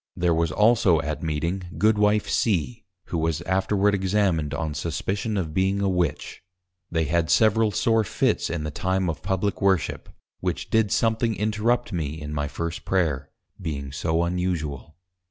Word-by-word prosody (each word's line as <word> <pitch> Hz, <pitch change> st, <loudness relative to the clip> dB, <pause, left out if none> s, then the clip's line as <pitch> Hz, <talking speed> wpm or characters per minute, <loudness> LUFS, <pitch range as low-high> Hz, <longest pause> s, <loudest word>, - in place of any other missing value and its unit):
There 85 Hz, -1 st, +2 dB
was 80 Hz, -1 st, +1 dB
also 105 Hz, -3 st, +4 dB
at 75 Hz, +2 st, -4 dB
Meeting, 85 Hz, +3 st, -3 dB
Goodwife 105 Hz, -1 st, +3 dB
C. 110 Hz, +2 st, 0 dB, 0.2 s
(who 85 Hz, -, -1 dB
was 80 Hz, 0 st, -1 dB
afterward 95 Hz, +2 st, +1 dB
Examined 95 Hz, -5 st, +1 dB
on 80 Hz, -2 st, -2 dB
suspicion 100 Hz, +7 st, -2 dB
of 80 Hz, -5 st, -2 dB
being 95 Hz, +3 st, +1 dB
a 100 Hz, -, +1 dB
Witch:) 90 Hz, -5 st, -1 dB, 0.5 s
They 80 Hz, -1 st, 0 dB
had 80 Hz, +2 st, 0 dB
several 110 Hz, +2 st, +4 dB
sore 115 Hz, +1 st, +2 dB
Fits -, -, 0 dB
in 80 Hz, -2 st, -3 dB
the 75 Hz, -, -3 dB
time 95 Hz, +2 st, 0 dB
of 75 Hz, -, -9 dB
Publick 95 Hz, +1 st, -1 dB
Worship, 95 Hz, -7 st, +1 dB, 0.3 s
which -, -, -3 dB
did 110 Hz, -2 st, +2 dB
something 115 Hz, 0 st, +1 dB
interrupt 110 Hz, +2 st, 0 dB
me 80 Hz, -2 st, -3 dB
in 75 Hz, 0 st, -6 dB
my 75 Hz, 0 st, -1 dB
first 85 Hz, +3 st, -4 dB
Prayer, 80 Hz, -8 st, 0 dB, 0.3 s
being 70 Hz, -5 st, -4 dB
so 80 Hz, +4 st, 0 dB
unusual. 85 Hz, -5 st, -3 dB
90 Hz, 155 wpm, -25 LUFS, 80-105 Hz, 0.5 s, also